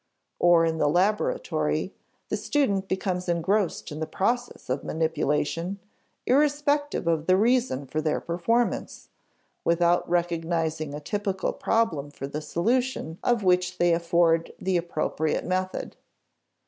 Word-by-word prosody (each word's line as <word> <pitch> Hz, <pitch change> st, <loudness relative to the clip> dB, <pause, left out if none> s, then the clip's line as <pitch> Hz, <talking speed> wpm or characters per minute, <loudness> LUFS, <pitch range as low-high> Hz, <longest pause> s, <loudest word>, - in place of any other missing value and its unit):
Or, 175 Hz, -1 st, +5 dB
in 160 Hz, -1 st, -1 dB
the 150 Hz, -, +3 dB
laboratory, 210 Hz, -, 0 dB, 0.4 s
the -, -, 0 dB
student 200 Hz, -10 st, 0 dB
becomes 185 Hz, -1 st, -2 dB
engrossed 175 Hz, +2 st, 0 dB
in 150 Hz, -, -6 dB
the 160 Hz, -, -2 dB
processes 245 Hz, +5 st, -2 dB
of 130 Hz, +2 st, -2 dB
manipulation, 160 Hz, +3 st, -1 dB, 0.5 s
irrespective 290 Hz, -, +2 dB
of 165 Hz, -2 st, 0 dB
the 185 Hz, 0 st, +5 dB
reason 230 Hz, -, +2 dB
for 155 Hz, +4 st, -2 dB
their 155 Hz, -1 st, 0 dB
performance, 230 Hz, +8 st, -1 dB, 0.5 s
without 170 Hz, +1 st, +2 dB
recognizing 165 Hz, -3 st, -1 dB
a -, -, -5 dB
typical 195 Hz, +4 st, -2 dB
problem 175 Hz, -11 st, 0 dB
for 140 Hz, -, -7 dB
the 145 Hz, +2 st, -5 dB
solution 195 Hz, -, -1 dB
of 240 Hz, -4 st, +2 dB
which 180 Hz, 0 st, +2 dB
they 175 Hz, -1 st, +3 dB
afford 170 Hz, -1 st, +2 dB
the 190 Hz, 0 st, 0 dB
appropriate 160 Hz, -2 st, -1 dB
method. 185 Hz, +1 st, -2 dB
175 Hz, 125 wpm, -26 LUFS, 160-205 Hz, 0.5 s, Or